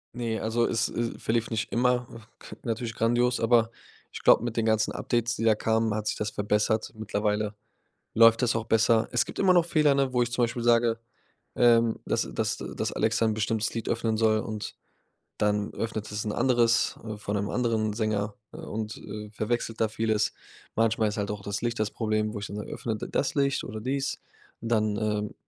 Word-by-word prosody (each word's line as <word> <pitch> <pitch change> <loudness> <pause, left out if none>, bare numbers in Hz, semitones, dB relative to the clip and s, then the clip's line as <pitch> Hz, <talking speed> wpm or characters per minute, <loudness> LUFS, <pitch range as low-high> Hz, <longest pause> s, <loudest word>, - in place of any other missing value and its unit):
Ne, 115 -2 -2
also 115 +2 +1
es 115 0 +1
es 115 0 -3
verlief 115 0 0
nicht 110 -2 -2
immer, 125 0 +2
ah, 115 - -11 0.4
natürlich 115 -1 -3
grandios, 120 +2 +2
aber 115 -1 +4 0.4
ich - - -7
glaube, - - +6
mit 115 -2 -3
den 115 - +1
ganzen 110 -1 +2
Updates, 120 0 -1
die - - -4
da 110 -1 +5
kamen, 110 0 +1
hat 105 0 -3
sich - - 0
das 105 - -2
verbessert. 105 +2 0
Mittlerweile 105 0 -1 0.6
läuft 115 +1 +6
das 125 -1 +2
auch 115 -1 -1
besser. 115 +1 +3
Es 120 -3 +2
gibt - - -6
immer 190 -2 +5
noch 175 -2 +5
Fehler, 155 -4 +3
ne, 135 -2 +1
wo 125 -1 +2
ich 120 - -1
zum 120 0 +2
Beispiel 120 +1 -3
sage, 115 -1 +3 0.5
ähm, 115 -1 +4
dass - - 0
dass - - -1
dass - - -4
Alexa 115 +1 +1
'n 110 -1 +1
bestimmtes 110 +1 -1
Lied 115 - -4
öffnen 115 -1 0
soll 110 -1 +3
und 110 -1 -5 0.7
dann 105 0 0
öffnet 110 -2 -4
es 105 +1 -3
'n 105 - -1
anderes, 120 0 +2
äh, 110 -2 -6
von 105 0 -3
'nem 100 0 -1
anderen 115 -3 0
Sänger 105 -1 -1 0.2
und, 110 0 -5
äh, 105 0 -8
verwechselt 115 +1 -2
da 110 - +4
vieles. 110 -1 0 0.4
Manchmal 115 -1 +2
ist 105 - -3
halt 105 0 -2
auch 105 -1 -5
das 100 +2 -4
Licht 120 -1 -1
das 110 -1 +1
Problem, 110 -1 -1
wo - - -3
ich 100 - -5
dann 100 - -7
sage: 105 - -6
„Öffne 115 -2 -3
d - - -6
das 140 - 0
Licht 140 -1 +1
oder 110 0 -6
dies.“ 135 +4 -2 0.4
Und 115 - -5
dann, 110 -2 +2
ähm, 105 -1 -1
110 Hz, 205 wpm, -27 LUFS, 105-120 Hz, 0.7 s, glaube